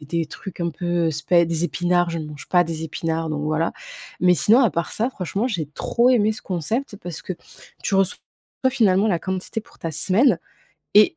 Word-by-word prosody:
des 150 - -12
des 165 +1 -1
trucs 180 +4 -9
un 170 0 0
peu 175 -1 0
spè 165 +4 +3
des 165 0 -1
épinards, 175 0 +1
je 165 - -3
ne 155 - -5
mange 150 -1 -10
pas 175 -1 +4
des 160 -1 -4
épinards 160 0 -2
donc, 150 -1 -2
voilà. 155 +2 0 0.5
Mais 180 0 +5
sinon 220 +7 +5
à 235 -7 +4
part 170 - -2
ça 230 +4 0
franchement 195 +3 -2
j'ai 175 - -2
trop 235 - +1
aimé 220 -3 +3
ce 215 - -9
concept 205 - -2
parce 165 -7 -7
que 185 - -4 0.5
tu 195 - 0
reçois 195 0 +2 0.5
finalement 210 -5 +3
la 175 -5 +2
quantité 190 +4 -3
pour - - -22
ta 165 - -4
semaine 195 - +3 0.6
et 325 - +6
175 Hz, 205 wpm, -22 LUFS, 165-205 Hz, 0.6 s, et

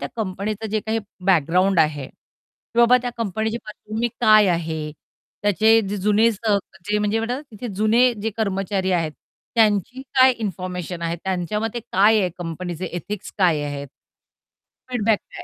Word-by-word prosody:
त्या 140 - -4
कंपनीचं 210 +1 -3
जे 215 0 0
काही 220 +1 0 0.3
बॅकग्राऊंड 180 +1 +3
आहे, 150 -3 0
की 230 - -14
बाबा 240 +1 +7
त्या 245 - -2
कंपनीची 220 +1 -1
पार्श्वभूमी 215 +2 -4
काय 215 -3 +6
आहे? 160 -3 -2 0.5
त्याचे 220 +2 +4
जे 205 - -2
जुने 210 +3 +3
स - - -9 0.6
म्हणजे 210 +2 0 0.3
तिथे 230 +2 -7
जुने 225 +5 +4
जे 225 - -1
कर्मचारी 195 -2 -1
आहेत, 165 -3 0 0.4
त्यांची 225 +3 +2 0.2
काय 260 0 +7
इन्फॉर्मेशन 180 -5 -5
आहे? 170 0 -1
त्यांच्या 190 +2 -1
मते 225 +2 -3
काय 215 +1 +3
आहे 185 -2 0
कंपनीचे 175 +1 -5
एथिक्स 195 +3 -6
काय 170 -6 +3
आहेत? 145 -1 -5 1.0
फीडबॅक 225 -4 +1
काय? - - -11
205 Hz, 145 wpm, -22 LUFS, 180-220 Hz, 1.0 s, बाबा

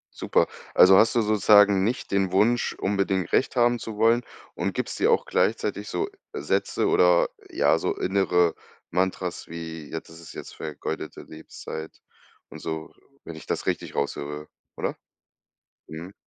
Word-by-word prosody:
Super. - - +1 0.3
Also, 95 +1 +8
hast 115 +4 +4
du 120 - +4
sozusagen 105 -2 +5
nicht 120 +4 -2
den 95 -2 +1
Wunsch, 115 +5 +2
unbedingt 95 -2 -1
Recht 135 - +1
haben 120 -1 +3
zu 110 -1 -7
wollen 115 +3 +3 0.3
und 95 +3 -2
gibst 125 - -4
dir 430 - +3
auch 460 - +3
gleichzeitig - - 0
so 405 - -2 0.2
Sätze - - 0
oder, - - +4 0.2
ja, 345 +5 +2
so 415 - -1
innere 90 - +2 0.4
Mantras 90 0 -2
wie: 80 -2 -7
„Jetzt 80 - -6
ist 80 0 -13
es 85 - -12
jetzt - - -9
vergeudete 75 -2 -6
Lebenszeit“ 80 0 -9 0.5
und - - -10
so, 80 -1 -5 0.3
wenn 85 - -8
ich 80 - -11
das - - -2
richtig - - -2
raushöre, 75 +1 -3 0.3
oder? - - -3 0.9
Mhm. 85 +5 -8
95 Hz, 150 wpm, -25 LUFS, 80-115 Hz, 0.9 s, Also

